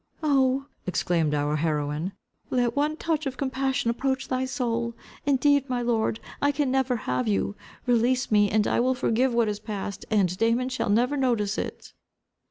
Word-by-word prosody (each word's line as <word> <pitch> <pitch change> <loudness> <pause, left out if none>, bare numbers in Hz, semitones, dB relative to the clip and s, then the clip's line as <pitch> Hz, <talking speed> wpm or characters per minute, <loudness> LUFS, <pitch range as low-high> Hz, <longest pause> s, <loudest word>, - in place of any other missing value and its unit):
"Oh," 270 -2 +2 0.2
exclaimed 165 -3 +1
our 145 +1 0
heroine, 150 +3 -1 0.4
"let 245 -2 +1
one 300 +2 +1
touch 315 -3 -1
of 265 - -5
compassion 265 -2 0
approach 265 +2 -2
thy 255 0 0
soul. 235 -3 -2 0.3
Indeed, 285 0 +3
my 245 -1 -1
lord, 225 -2 0 0.2
I 285 - +3
can 285 -2 0
never 265 -1 +1
have 125 -1 0
you. 100 -1 0 0.3
Release 245 +1 +2
me, 205 -1 +4
and 215 0 +2
I - - +1
will 255 +2 +2
forgive 250 +1 +1
what 235 -1 +2
is 210 -1 -2
past, 205 -2 -5
and 195 -5 +2
Damon 235 +3 +2
shall 255 -5 -2
never 245 +7 +2
notice 230 -6 +1
it." - - -6
240 Hz, 170 wpm, -26 LUFS, 205-265 Hz, 0.4 s, me